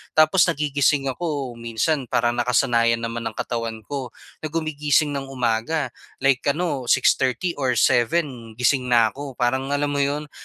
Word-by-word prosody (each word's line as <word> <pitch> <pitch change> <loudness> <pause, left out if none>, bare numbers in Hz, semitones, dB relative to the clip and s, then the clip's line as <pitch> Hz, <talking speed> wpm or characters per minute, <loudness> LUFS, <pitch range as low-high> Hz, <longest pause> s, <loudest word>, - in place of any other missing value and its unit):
Tapos 155 +4 +5
nagigising 145 -3 +1
ako 145 -4 -3
minsan, 120 +4 -1
parang 120 +1 0
nakasanayan 115 -1 +2
naman 115 0 -3
ng - - -7
katawan 115 -2 -4
ko 135 0 -5 0.3
na 155 - -4
gumigising 150 -1 0
ng 135 -1 -4
umaga. 125 +3 -1 0.3
Like 135 0 +2
ano, 145 -4 -1
6:30 130 +10 +2
or 130 -2 +1
7 120 -1 +1
gising 125 +1 +1
na 115 -3 +4
ako. 140 -2 -8
Parang 130 +2 0
alam 145 0 0
mo 145 - -1
'yon, 145 +1 -1
135 Hz, 150 wpm, -22 LUFS, 120-145 Hz, 0.3 s, Tapos